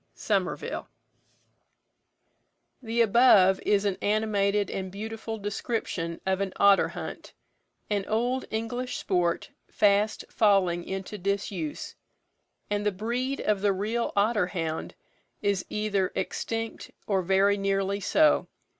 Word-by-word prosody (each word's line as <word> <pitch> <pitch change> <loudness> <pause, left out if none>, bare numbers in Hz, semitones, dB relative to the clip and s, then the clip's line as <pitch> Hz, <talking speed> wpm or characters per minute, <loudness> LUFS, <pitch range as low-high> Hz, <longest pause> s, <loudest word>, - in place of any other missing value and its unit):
SOMERVILLE. - - -2 1.9
The 235 -1 0
above 205 -4 +6
is 205 0 +2
an 195 -2 -1
animated 205 -1 +1
and 190 -1 -4
beautiful 220 +2 -5
description 200 -5 -3
of 190 0 0
an 195 -1 -2
otter 200 -1 +5
hunt, - - -8 0.5
an 205 -2 -1
old 245 +4 0
English 245 +3 -3
sport 175 -3 0 0.2
fast 205 +1 +2
falling 190 -5 +2
into 195 +2 -5
disuse, 195 -4 -3 0.7
and 205 0 -1
the 210 - +2
breed 240 +7 -2
of 210 -2 +1
the 200 -1 +3
real 220 +5 -1
otter 205 -1 +2
hound 165 -4 -4 0.5
is 200 -2 +1
either 205 -3 0
extinct 225 0 -3 0.2
or 195 -2 +1
very 195 +2 +3
nearly 195 0 0
so. 305 +10 +3
205 Hz, 115 wpm, -27 LUFS, 190-220 Hz, 1.9 s, above